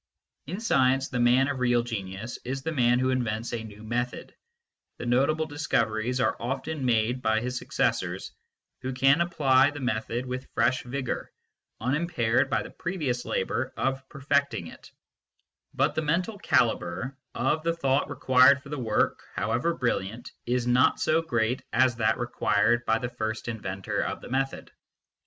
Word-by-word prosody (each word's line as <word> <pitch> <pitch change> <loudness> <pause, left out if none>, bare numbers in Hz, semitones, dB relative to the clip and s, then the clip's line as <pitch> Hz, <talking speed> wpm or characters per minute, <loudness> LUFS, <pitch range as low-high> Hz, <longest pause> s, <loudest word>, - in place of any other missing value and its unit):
In 180 +7 -4
science 135 - +2
the 125 - -2
man 125 +2 +4
of 140 -2 -2
real 120 -1 +2
genius 110 0 -5
is 135 +2 -4
the 160 - -2
man 125 -4 +3
who 130 +1 +1
invents 115 -2 -2
a 115 -1 -3
new 105 -1 -11
method. 120 +2 -3 0.6
The - - -6
notable 140 +6 +2
discoveries 125 -5 -1
are - - +2
often 135 +4 -3
made 120 +1 +1
by 110 -2 +2
his 125 +2 -3
successors, - - -1 0.5
who 130 0 -3
can 135 +5 +4
apply 145 -6 +4
the 145 0 -7
method 120 0 -2
with 130 0 -5
fresh 120 +3 +2
vigour, 130 0 -4 0.5
unimpaired 130 -2 +1
by - - +1
the - - -10
previous 150 -10 -3
labour 120 +7 -2
of 135 0 -2
perfecting 140 - 0
it; - - -12 0.8
but - - +1
the 155 - -1
mental 180 +7 -1
calibre 115 - +1 0.2
of 140 +5 +1
the 165 +1 0
thought 140 -3 +1
required 130 0 +5
for - - -12
their 150 -1 -4
work, 110 -3 +1
however 120 +10 0
brilliant, 115 - -2 0.2
is 125 0 0
not 125 +2 +3
so 160 +1 +2
great 120 -5 0
as 125 0 +3
that 110 -2 +2
required 120 -1 +1
by 110 - +3
the 120 - -3
first 110 -2 -4
inventor 100 -4 -3
of - - -3
the - - -11
method. 135 +1 -2
125 Hz, 160 wpm, -27 LUFS, 115-140 Hz, 0.8 s, required